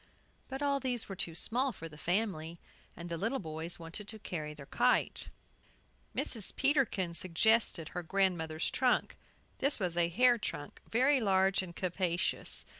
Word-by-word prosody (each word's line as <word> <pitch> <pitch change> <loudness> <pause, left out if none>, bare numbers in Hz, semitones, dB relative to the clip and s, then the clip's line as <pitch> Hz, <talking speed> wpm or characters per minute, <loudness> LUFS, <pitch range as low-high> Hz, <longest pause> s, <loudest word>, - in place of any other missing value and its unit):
But 270 +2 -4
all 280 -1 +2
these 250 -3 -1
were 195 - -6
too 170 -3 -2
small 255 +9 +2
for 165 -7 -8
the 155 - -13
family. 170 -1 -2 0.4
And 170 - -7
the 170 -1 -4
little 225 +8 0
boys 160 -3 -4
wanted 170 +5 -8
to 220 - -5
carry 155 -7 -5
their 140 -2 -9
kite. 245 - +1 0.9
Mrs. 220 -5 +1
Peterkin 265 - +1
suggested 185 -1 +2
her 180 - -4
grandmother's 170 -3 0
trunk. 255 -1 +1 0.4
This 280 +2 +5
was 180 -4 -1
a 170 -1 +2
hair 240 +6 +4
trunk, 145 -8 -6
very 260 +3 +4
large 190 -2 +3
and 175 -2 -8
capacious. 180 -1 -1
190 Hz, 155 wpm, -32 LUFS, 170-240 Hz, 0.9 s, This